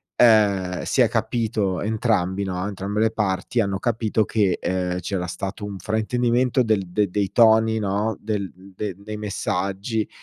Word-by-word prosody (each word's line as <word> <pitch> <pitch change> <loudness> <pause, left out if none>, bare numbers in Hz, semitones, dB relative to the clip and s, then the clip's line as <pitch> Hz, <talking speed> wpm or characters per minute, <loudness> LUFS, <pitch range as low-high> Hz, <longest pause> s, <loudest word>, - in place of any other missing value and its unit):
ehm, 100 -6 +4
si - - +1
è - - +5
capito 105 -5 -1
entrambi, 100 -3 0
no, 90 -1 -3
entrambe 100 +1 -3
le 110 - +4
parti, 105 +1 -1
hanno 100 -2 -1
capito 110 -1 0
che, 100 -5 +1
ehm, 90 -1 -1
c'era 90 0 -3
stato 95 +3 -5
un 100 -1 -6
fraintendimento 120 +5 +1
del 105 -5 0
dei 100 +2 0
dei 100 +1 -1
toni, 110 -1 +5
no, 105 +1 -1
del 105 -3 -3
dei 95 +1 -6
dei 105 +2 -7
messaggi 100 +1 -2
105 Hz, 155 wpm, -23 LUFS, 95-110 Hz, -, è